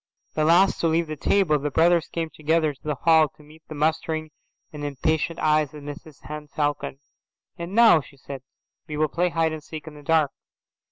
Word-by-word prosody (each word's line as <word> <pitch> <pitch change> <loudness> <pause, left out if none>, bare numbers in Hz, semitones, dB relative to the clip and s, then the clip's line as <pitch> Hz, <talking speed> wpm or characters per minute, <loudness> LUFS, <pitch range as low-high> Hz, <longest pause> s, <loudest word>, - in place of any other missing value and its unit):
The 155 - +1
last 175 +4 +4
to 165 - +2
leave 165 +1 +2
the 155 -1 -5
table, 155 0 +2
the 145 +1 -2
brothers 170 +3 +3
came 165 -1 -4
together 155 0 +1
to 135 - -27
the 150 -1 -2
hall 160 +1 +4
to 150 - -17
meet 155 +2 -17
the 155 - -8
mustering 155 +1 -1 0.4
and 150 -1 -7
impatient 155 +3 -1
eyes 155 -1 +1
of 150 - -10
Mrs 145 0 -10
Henne 150 +2 -7
Falcon. 145 -2 -2 0.6
"And 170 +3 -6
now," 225 -8 +7
she 140 - -17
said, 135 0 -8 0.5
"we 150 -2 -5
will 155 0 +1
play 180 +4 0
hide 165 -1 0
and 155 - -6
seek 155 -2 -8
in 155 - -9
the 150 - -12
dark." 155 -1 +2
155 Hz, 205 wpm, -24 LUFS, 150-165 Hz, 0.6 s, now